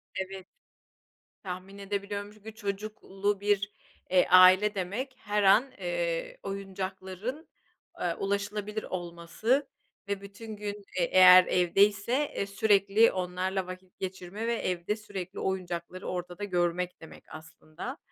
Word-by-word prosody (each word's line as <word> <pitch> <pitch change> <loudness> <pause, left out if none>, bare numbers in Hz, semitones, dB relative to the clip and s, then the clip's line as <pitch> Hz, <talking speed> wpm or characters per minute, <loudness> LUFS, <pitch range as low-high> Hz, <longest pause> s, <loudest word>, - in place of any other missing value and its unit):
Evet. 190 0 -5 1.0
Tahmin 185 +1 -7
edebiliyorum 200 +1 -4
çünkü 215 +1 -12
çocuklu 205 -1 -3
bir, 200 0 +1 0.4
eee, 185 0 +4
aile 185 +3 +7
demek 205 +9 -3
her 210 -1 -1
an, 215 +8 +5
eee, - - -2
oyuncakların, 195 - -5 0.5
aaa, 170 -2 -2
ulaşılabilir 205 +2 -2
olması 175 +10 -1 0.4
ve 200 -1 -2
bütün 215 +2 -9
gün, 205 0 -4 0.3
e, - - +3
eğer 185 +1 +8
evdeyse, 200 +5 +3 0.2
e - - -1
sürekli 200 +1 +4
onlarla 185 +1 -2
vakit 185 0 -10
geçirme 190 +3 -5
ve 235 - +1
evde 180 -2 -1
sürekli 195 -4 -7
oyuncakları 185 -1 -3
ortada 180 +1 -5
görmek 180 -2 -1
demek 160 - -12
aslında. 160 - -9
195 Hz, 115 wpm, -29 LUFS, 185-210 Hz, 1.0 s, eğer